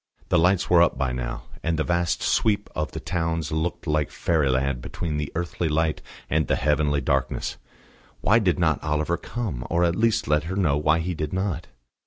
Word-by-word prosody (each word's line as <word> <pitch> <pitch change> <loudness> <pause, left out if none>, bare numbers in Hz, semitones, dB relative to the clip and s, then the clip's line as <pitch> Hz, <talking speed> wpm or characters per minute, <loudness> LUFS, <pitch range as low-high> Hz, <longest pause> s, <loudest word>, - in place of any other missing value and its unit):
The - - +4
lights 90 +2 +3
were 85 -1 +5
up 85 - +3
by 65 -1 0
now, - - -4 0.2
and 85 -1 0
the 80 - +1
vast 85 0 0
sweep 105 -2 +1
of 75 0 -2
the - - -5
towns 80 -3 -2
looked 80 +3 -2
like 75 -2 +1
fairyland 70 -5 +1
between 75 +4 -4
the 75 -1 -3
earthly 85 0 -2
light 80 0 0 0.3
and 80 -1 +1
the - - +2
heavenly 75 0 +1
darkness. 70 -4 -1 0.6
Why 115 +4 +4
did 95 -5 +1
not 80 -4 +1
Oliver 75 +2 0
come, 105 - -4
or 85 +1 +2
at 85 0 +2
least 115 +1 +1
let 75 +1 +2
her 95 +3 -3
know 85 -8 +2
why 75 +2 +2
he 90 +2 -2
did 75 -1 -4
not? 95 -4 -2
80 Hz, 195 wpm, -25 LUFS, 75-85 Hz, 0.6 s, were